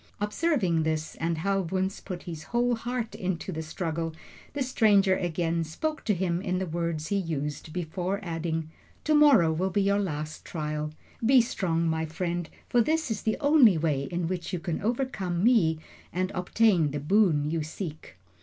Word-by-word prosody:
Observing 210 - +1
this, 155 0 -1
and 165 0 -1
how 195 +4 +1
Wunzh 190 +2 -2
put 180 -3 -6
his 165 -3 -7
whole 240 +1 +1
heart 235 -1 -3
into 190 -3 -3
the 160 -2 -4
struggle, 165 0 -3 0.4
the 285 -2 -1
stranger 205 -6 +4
again 170 -2 -1
spoke 305 - -3
to 210 - +2
him 175 -1 -1
in 185 -1 -1
the 190 - -1
words 165 -2 -3
he 200 - +1
used 155 -4 -3
before, 180 +3 -2
adding: 165 -2 -3 0.3
"To 305 - +2
morrow 270 - +6
will 185 +4 0
be 195 +2 +1
your 200 +1 +2
last 155 -5 -4
trial. 150 -2 -3 0.3
Be 255 +3 +6
strong, 170 -8 0
my 160 0 0
friend, 170 +1 -3 0.2
for 240 - +3
this 315 +2 0
is 215 - -2
the 220 - 0
only 285 - +6
way 150 -4 0
in 175 +2 -2
which 180 -1 -3
you 180 - -1
can 170 -1 -3
overcome 205 -6 -1
me 210 -10 +4 0.3
and 185 +1 -1
obtain 180 -3 +3
the 145 +1 -3
boon 155 -3 +3
you 165 -1 0
seek." 155 - -7
180 Hz, 175 wpm, -28 LUFS, 160-210 Hz, 0.4 s, morrow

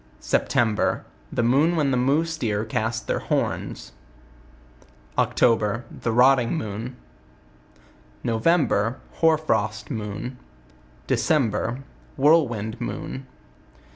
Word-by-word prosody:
The 105 - 0
moon 140 +8 +3
when 145 -4 +1
theMoose 140 +6 +2 0.3
Deercasttheirhorn8 110 +1 -2 1.3
October 115 -1 +2
The 115 - -3
rotting 125 +2 +4
moon. 115 -1 -5 1.3
November 115 -2 +2
% - - -27
Hoar 160 -1 +4
frost 110 -6 -1
moon. 110 +2 -5 0.7
December 125 -3 0 0.3
Whirlwind 125 -7 +2
moon. 130 +2 -5
120 Hz, 75 wpm, -24 LUFS, 110-140 Hz, 1.3 s, rotting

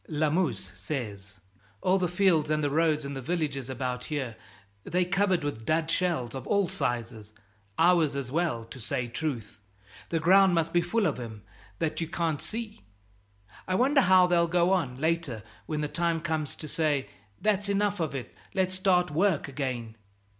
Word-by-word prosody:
Lamuse 150 - 0
says: 100 -3 -6 0.4
"All 185 +1 +3
the 180 - +1
fields 175 -4 +2
and 155 0 +1
the 145 - +1
roads 155 -1 +2
and 140 0 -5
the 135 - -4
villages 140 -4 -2
about 125 -1 -3
here, 135 -7 -3 0.5
they're 180 +1 +1
covered 190 -2 +1
with 145 -6 -3
dud 160 +5 +1
shells 165 -11 0
of 130 - -6
all 200 -2 +2
sizes 115 - -3 0.5
ours 165 -4 +4
as 135 -3 -3
well, 155 -8 0
to 120 +3 -11
say 125 +1 -2
truth. 120 -5 -4 0.5
The 165 - 0
ground 190 +2 +5
must 165 0 0
be 175 - +4
full 205 +5 0
of 150 -7 0
'em, 110 -4 -8 0.3
that 165 0 -1
you 165 - -1
can't 165 -2 -1
see. 225 -1 -5 0.9
I 185 - 0
wonder 275 +6 +4
how 185 -4 +6
they'll 175 -1 +3
go 175 +1 +2
on, 135 -9 -1
later, 160 -8 -1 0.2
when 155 -1 -2
the 150 - -1
time 170 +1 0
comes 155 -2 -2
to 155 - -8
say, 150 -3 0 0.3
'That's 205 -1 +1
enough 200 0 +1
of 155 -4 -2
it, 130 - -6 0.2
let's 185 -1 +1
start 185 -3 +2
work 170 0 +2
again.'" 130 -5 -4
160 Hz, 175 wpm, -28 LUFS, 130-180 Hz, 0.9 s, how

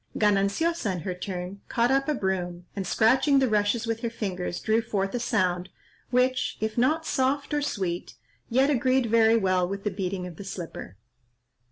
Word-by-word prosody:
Gananciosa, 210 - +1
in 180 - -4
her 185 +3 -3
turn, 180 +1 -6
caught 235 +2 +1
up 275 0 +2
a 300 - +1
broom, 180 -4 -2
and, 195 -3 -3
scratching 260 +8 +4
the 265 -1 +4
rushes 215 +1 +1
with 225 -1 -2
her 235 - -2
fingers, 185 -6 -4
drew 220 +1 +2
forth 195 -4 -2
a 245 - -1
sound 185 -6 0 0.4
which, 255 +1 +1
if 220 0 -2
not 310 +7 +2
soft 275 +1 0
or 295 - +1
sweet, 185 -10 -3 0.3
yet 265 +5 +3
agreed 260 -1 +2
very 225 0 +4
well 185 -4 +2
with 195 0 -5
the 210 - -1
beating 185 -1 -3
of 175 -3 -9
the - - -7
slipper. 175 - -7
215 Hz, 180 wpm, -26 LUFS, 185-250 Hz, 0.4 s, scratching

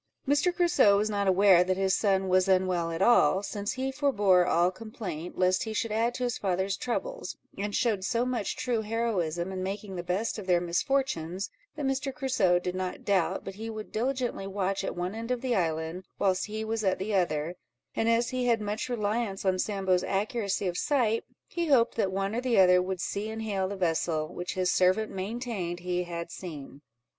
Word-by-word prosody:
Mr. 290 +6 +3
Crusoe 345 - +4
was 215 +1 0
not 200 -1 0
aware 190 -1 +6
that 185 0 -1
his 190 -1 +2
son 195 -2 +1
was 185 0 +3
unwell 185 -3 +2
at 165 0 -1
all, 195 -5 +5
since 205 0 -3
he 265 +1 -2
forbore 205 -11 +3
all 175 +2 +3
complaint, 185 -5 -7
lest 185 0 +3
he 220 - -3
should 230 0 -1
add 230 +3 +1
to 250 - -3
his 245 -2 -1
father's 190 0 0
troubles, - - -4 0.2
and 205 +1 -3
showed 215 -6 +1
so 235 +4 +1
much 245 -6 -2
true 240 -3 -1
heroism 195 -6 -1
in 185 -1 -4
making 195 +1 -4
the 175 - -3
best 190 +6 -2
of 195 - -8
their 180 -1 +4
misfortunes, 180 - -1 0.2
that 300 -2 -3
Mr. 270 +1 -1
Crusoe 255 -10 +2
did 180 0 -3
not 185 0 -4
doubt 195 -4 +1
but 195 - -5
he 220 +3 -6
would 215 -1 -7
diligently 245 -3 -2
watch 195 0 -1
at - - -3
one 180 +2 -3
end 225 +1 -6
of 250 -1 -1
the 255 -2 0
island, 165 0 -1
whilst 190 0 +1
he 215 +1 -4
was 220 0 -2
at 190 -2 +2
the 205 +3 -3
other; 170 -3 0 0.4
and 225 - +1
as 230 +1 +2
he 255 -1 -1
had 230 -1 +3
much 210 +3 -3
reliance 210 -3 -1
on 185 -1 +2
Sambo's 190 -3 +1
accuracy 200 0 -1
of 180 -1 -1
sight, 235 -6 +1 0.2
he 340 -1 -3
hoped 245 -5 +4
that 195 -4 +1
one 195 +2 -1
or 240 - -1
the 250 -2 +1
other 180 -1 +6
would 185 0 -3
see 205 +4 -3
and 220 0 -5
hail 195 -3 -1
the 200 - -4
vessel, 165 -3 -1
which 175 0 -4
his 185 -1 +1
servant 185 +4 +2
maintained 195 -3 -4
he 180 0 -1
had 170 -1 -5
seen. 145 -5 -8
195 Hz, 205 wpm, -28 LUFS, 180-230 Hz, 0.4 s, aware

